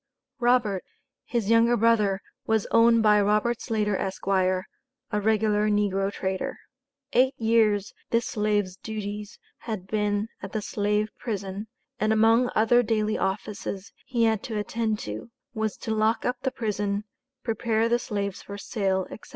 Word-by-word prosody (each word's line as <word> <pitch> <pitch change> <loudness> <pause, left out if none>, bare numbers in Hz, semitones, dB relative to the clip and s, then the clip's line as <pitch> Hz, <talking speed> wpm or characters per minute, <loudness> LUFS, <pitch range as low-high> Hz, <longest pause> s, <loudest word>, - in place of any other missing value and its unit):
Robert, 240 -6 +2 0.4
his 230 -3 -1
younger 230 +1 +5
brother, 210 -4 +3 0.3
was 220 -2 +2
owned 230 0 +5
by 210 -1 +5
Robert 210 +3 +1
Slater, 210 -3 0
Esq., 190 0 -4
a 185 -1 +2 0.6
regular 210 0 +2
negro 200 -1 +1
trader. 190 -1 -3 0.6
Eight 260 +2 +4
years 220 -3 +2 0.2
this 230 0 +2
slave's 210 -3 0
duties 210 -1 -6 0.2
had 215 -6 -5
been 210 +1 0
at 195 +1 -7
the 215 - -1
slave 210 +1 0
prison, 200 -2 -4 0.3
and 215 0 +2
among 225 +3 +4
other 225 +3 +5
daily 215 -2 0
offices 195 0 -3
he 240 -3 +1
had 220 -2 +2
to 220 - -3
attend 220 +1 -1
to, 105 - -6 0.2
was 220 -2 -2
to 220 - -3
lock 220 +1 +1
up 250 0 0
the 265 - 0
prison, 205 -4 -2 0.4
prepare 225 -1 +1
the 240 +1 +2
slaves 200 -4 -3
for 200 - -8
sale, 190 -2 -1
etc. - - -9
215 Hz, 145 wpm, -26 LUFS, 200-230 Hz, 0.6 s, younger